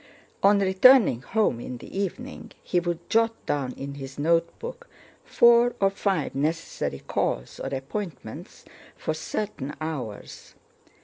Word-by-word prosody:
On 200 +1 +6
returning 195 - +6
home 205 - +1
in 125 +1 -6
the - - -11
evening 200 +7 -4
he 180 - +1
would 175 0 -4
jot 225 0 +2
down 135 -3 -1
in 140 +1 -6
his 135 -1 -8
notebook 170 - -1 0.4
four 235 0 +5
or 195 0 +3
five 195 -5 -1
necessary 145 - -2
calls - - -2
or - - -4
appointments 140 +7 -6 0.3
for 155 - -2
certain 155 -4 -4
hours. 135 -10 -6
170 Hz, 125 wpm, -26 LUFS, 135-210 Hz, 0.4 s, On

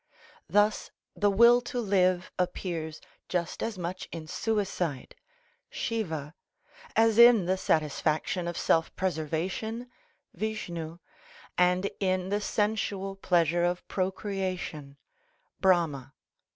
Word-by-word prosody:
Thus 210 +1 +2 0.3
the 205 - +2
will 235 +4 +6
to 245 0 -4
live 185 -4 +2
appears 170 -3 -3 0.3
just 175 -2 -2
as 225 -3 -3
much 180 +1 -5
in 165 -2 -6
suicide 185 - -2 0.6
(Siva) 160 - -3 0.6
as 225 0 +4
in 235 -5 +8
the 185 +2 +2
satisfaction 155 +1 0
of 175 0 -4
self 165 -2 +2
preservation 190 +8 -2 0.4
(Vishnu) 170 -5 -4 0.6
and 180 +2 +3
in 185 -1 0
the 205 +1 0
sensual 205 -2 -1
pleasure 175 -3 +2
of 175 0 -1
procreation 185 -7 -3 0.6
(Brahma). 165 -8 +1
185 Hz, 100 wpm, -28 LUFS, 165-205 Hz, 0.6 s, in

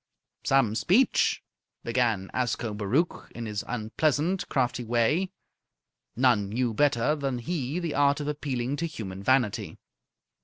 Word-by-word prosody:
"Some 135 -6 +3
speech!" 205 - +2 0.4
began 115 -5 0
Ascobaruch 115 - -1
in 115 - -5
his 105 -2 -3
unpleasant, 150 - 0
crafty 125 -2 0
way. 120 +11 +1 0.9
None 120 -5 +3
knew 120 +2 0
better 145 +2 +2
than 135 -4 -2
he 145 +2 -3
the 170 -4 -2
art 145 0 +3
of 145 - -4
appealing 140 -3 -2
to 170 - -1
human 100 - -7
vanity. 125 -1 +1
125 Hz, 120 wpm, -27 LUFS, 115-150 Hz, 0.9 s, Some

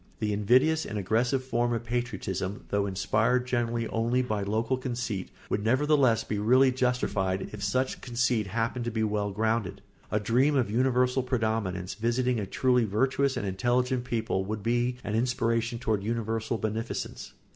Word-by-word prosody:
The 105 -1 -1
invidious 130 +10 +3
and 105 - -5
aggressive 120 +7 +1
form 120 -2 0
of 115 - -2
patriotism, 115 -5 -3
though 100 0 +1
inspired 115 +6 +1
generally 120 -2 -1
only 120 +3 +1
by 110 -4 -2
local 110 +5 0
conceit, 120 -7 -3 0.2
would 105 - -1
nevertheless 130 -1 +3
be 105 - -3
really 130 +5 +5
justified 125 -7 0
if 105 -2 -7
such 130 +6 0
conceit 120 -3 0
happened 115 +3 -2
to - - 0
be 110 -1 -1
well 105 -1 0
grounded. 110 -1 -1 0.3
A 105 - +1
dream 125 +8 +2
of 125 -6 +1
universal 125 +2 +2
predominance 110 -7 -1
visiting 120 +2 0
a 100 - -3
truly 125 +1 +2
virtuous 130 +6 +1
and - - -2
intelligent 120 +6 0
people 115 -6 -1
would 105 0 -4
be 120 +2 +1
an 105 - -3
aspiration 115 0 0
toward 110 -4 -1
universal 115 +1 -2
beneficence. 110 +2 -4
115 Hz, 155 wpm, -28 LUFS, 105-125 Hz, 0.3 s, really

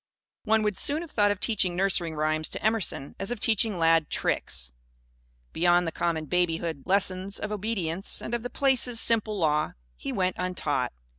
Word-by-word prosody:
One 220 0 +3
would 210 -2 -1
as - - -3
soon 295 +3 +2
have 330 - -11
thought 205 -1 +3
of 205 -2 -1
teaching 190 -6 +1
nursery 180 -3 +1
rhymes 155 0 0
to - - -6
Emerson 215 -10 0
as 195 - -1
of 245 -2 -2
teaching 220 -2 +2
Lad 165 -1 +3
"tricks." 60 0 -1 0.8
Beyond 175 +1 +3
the 165 - -2
common 165 -2 -1
babyhood 165 -2 -1
lessons 190 0 0
of 210 - -4
obedience 195 -4 0
and 230 - -6
of 240 - -1
the 245 - -5
Place's 255 -4 +1
simple 220 -2 +2
Law, 155 -3 +1 0.2
he - - -6
went 185 +1 -1
untaught. 180 0 -1
185 Hz, 175 wpm, -27 LUFS, 165-215 Hz, 0.8 s, One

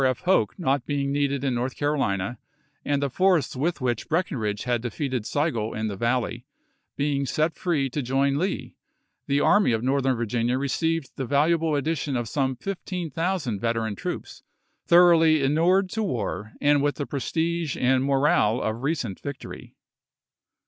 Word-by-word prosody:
F. 130 -1 +1
Hoke 185 +1 +2
not 140 -7 0
being 140 -1 -1
needed 140 -1 0
in 135 -2 +1
North 125 +2 -2
Carolina, 120 -7 -1 0.4
and 145 -1 0
the 140 - 0
force 180 -6 +2
with 150 +4 -1
which 120 +1 -2
Breckinridge 130 - -1
had 120 -2 0
defeated 125 -1 -3
Sigel 135 -8 -1
in 110 0 -2
the 100 - -4
Valley 120 +3 -1 0.5
being 140 0 0
set 155 +4 0
free 155 -7 0
to 145 - -2
join 135 +2 +1
Lee, 190 +3 -3 0.5
the 140 +1 +2
Army 205 - +4
of 110 +1 -1
Northern 135 0 +1
Virginia 120 +2 0
received 160 +2 -1
the 135 - -2
valuable 155 +3 +2
addition 145 -2 -1
of 120 -1 -3
some 130 +2 -1
fifteen 180 +1 -5
thousand 165 - -1
veteran 115 -1 -1
troops, - - -6 0.5
thor 175 +1 +7
oughly 160 -3 +4
inured 170 +7 +3
to 220 - -2
war 110 - -3
and 145 0 +3
with 145 0 +1
the 145 - -3
prestige 160 +3 -2
and 130 +1 +2
morale 135 -5 +2
of 110 0 -2
recent 135 - -2
victory. 140 -2 -8
140 Hz, 160 wpm, -25 LUFS, 120-160 Hz, 0.5 s, thor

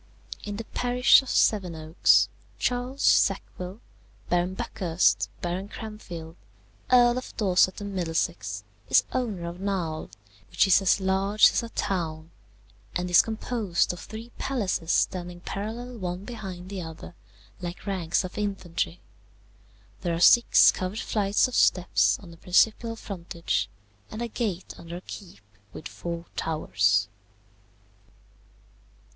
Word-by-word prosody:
"In 205 -1 -5
the 225 - -4
parish 250 +3 +4
of 265 - -10
Sevenoaks, 170 -6 +3 0.3
Charles 250 +2 -2
Sackville, 185 +4 +1 0.5
Baron 175 +1 +1
Buckhurst, 175 -2 +1
Baron 180 +3 -2
Cranfield, 175 -7 -8 0.5
Earl 245 0 +5
of 255 - -12
Dorset 185 -3 +3
and 200 -1 -5
Middlesex, 105 - -2 0.3
is - - +6
owner 215 -9 -2
of 170 +1 -7
Knowle, 180 -5 -2 0.4
which - - +3
is 195 0 +5
as 195 +1 +3
large 195 +2 +4
as - - +1
a 230 - -7
town 165 -6 -3 0.6
and 180 0 -2
is 175 - +8
composed 220 -6 -1
of 175 - -9
three 225 +3 -9
palaces 200 -10 -1
standing 175 -1 0
parallel 230 +6 -5
one 180 +1 -4
behind 190 -6 -7
the 195 -2 -4
other, 160 +1 -9 0.5
like 175 0 -6
ranks 185 -3 0
of 185 +3 -6
infantry. 175 - -3 1.0
There 170 -1 -1
are - - -3
six 235 +7 +7
covered 185 +4 -4
flights 205 0 +2
of 255 - -9
steps 180 -6 +3
on 180 -4 -13
the 165 - -13
principal 220 +6 +2
frontage, 175 -5 -3 0.4
and 215 +2 -5
a - - -2
gate 210 -6 -3
under 170 +1 -7
a - - -9
keep 180 - -10 0.3
with 155 - -7
four 170 0 -6
towers. 100 - +1
185 Hz, 130 wpm, -26 LUFS, 170-215 Hz, 1.0 s, is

